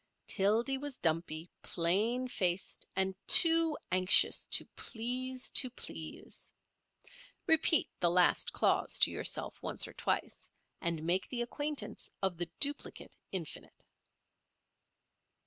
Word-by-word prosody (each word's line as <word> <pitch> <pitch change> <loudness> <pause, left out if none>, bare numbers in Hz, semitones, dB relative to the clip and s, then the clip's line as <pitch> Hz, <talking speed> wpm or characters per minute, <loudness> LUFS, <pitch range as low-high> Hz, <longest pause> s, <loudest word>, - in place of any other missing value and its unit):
Tildy 225 +7 0
was 285 -2 -7
dumpy, 160 0 -1
plain 210 +9 0
faced, 185 -5 -2
and 190 0 0
too 330 -2 +8
anxious 185 +1 +5
to - - +2
please 255 +2 -3
to 255 - +2
please. 245 - -7 0.9
Repeat 320 0 +3
the 175 - +2
last 180 +1 +2
clause - - 0
to - - +3
yourself - - -4
once - - -3
or - - -13
twice, - - -3 0.3
and 170 -3 -2
make 175 +3 -1
the 240 -2 -3
acquaintance 290 -2 -5
of 185 -3 -2
the 175 -1 -2
duplicate 285 0 -4 0.2
infinite. 175 -5 -7
210 Hz, 115 wpm, -32 LUFS, 175-260 Hz, 0.9 s, too